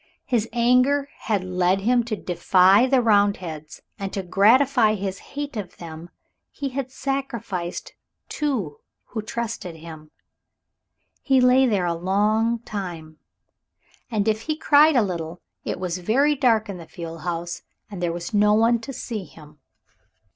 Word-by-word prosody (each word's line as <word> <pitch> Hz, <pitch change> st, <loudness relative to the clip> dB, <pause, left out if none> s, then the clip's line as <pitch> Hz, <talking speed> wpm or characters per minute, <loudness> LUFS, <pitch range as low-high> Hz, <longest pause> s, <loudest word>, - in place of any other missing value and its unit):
His 230 Hz, -3 st, 0 dB
anger 250 Hz, +4 st, +3 dB
had 210 Hz, -6 st, -2 dB
led 185 Hz, +1 st, +1 dB
him 240 Hz, +3 st, +2 dB
to 225 Hz, -2 st, -2 dB
defy 185 Hz, +4 st, +4 dB
the 260 Hz, -2 st, +3 dB
Roundheads, 200 Hz, -8 st, 0 dB, 0.2 s
and 195 Hz, -1 st, -4 dB
to 195 Hz, -, -3 dB
gratify 220 Hz, +5 st, +4 dB
his 195 Hz, -1 st, -4 dB, 0.2 s
hate 290 Hz, -2 st, -4 dB
of 200 Hz, -5 st, -6 dB
them 165 Hz, 0 st, -9 dB, 0.4 s
he 280 Hz, -1 st, -5 dB
had 260 Hz, 0 st, -4 dB
sacrificed 235 Hz, -11 st, -4 dB
those -, -, -27 dB, 0.3 s
two 235 Hz, -, -2 dB, 0.3 s
who 220 Hz, -, -4 dB
trusted 220 Hz, -5 st, -5 dB
him. 160 Hz, -1 st, -11 dB, 1.1 s
He 265 Hz, -2 st, +3 dB
lay 255 Hz, +1 st, +5 dB
there 200 Hz, -6 st, +1 dB
a 170 Hz, -, 0 dB
long 210 Hz, +6 st, +1 dB
time, 175 Hz, -8 st, -7 dB, 0.9 s
and 215 Hz, -3 st, -1 dB
if 220 Hz, 0 st, +1 dB
he 310 Hz, +5 st, -3 dB
cried 305 Hz, 0 st, +5 dB
a 240 Hz, -, +5 dB
little 170 Hz, -3 st, -4 dB, 0.3 s
it -, -, -3 dB
was 180 Hz, -1 st, -3 dB
very 265 Hz, +11 st, +2 dB
dark 240 Hz, -6 st, +2 dB
in 200 Hz, -2 st, -6 dB
the 165 Hz, -, -11 dB
fuel 165 Hz, 0 st, -8 dB
house, 170 Hz, +1 st, -4 dB, 0.3 s
and 190 Hz, -3 st, -7 dB
there 175 Hz, -1 st, 0 dB
was 170 Hz, +5 st, -6 dB
no 210 Hz, 0 st, +4 dB
one 230 Hz, +2 st, +3 dB
to 270 Hz, +4 st, -8 dB
see 220 Hz, -6 st, -5 dB
him. 150 Hz, -3 st, -16 dB
210 Hz, 155 wpm, -23 LUFS, 175-245 Hz, 1.1 s, lay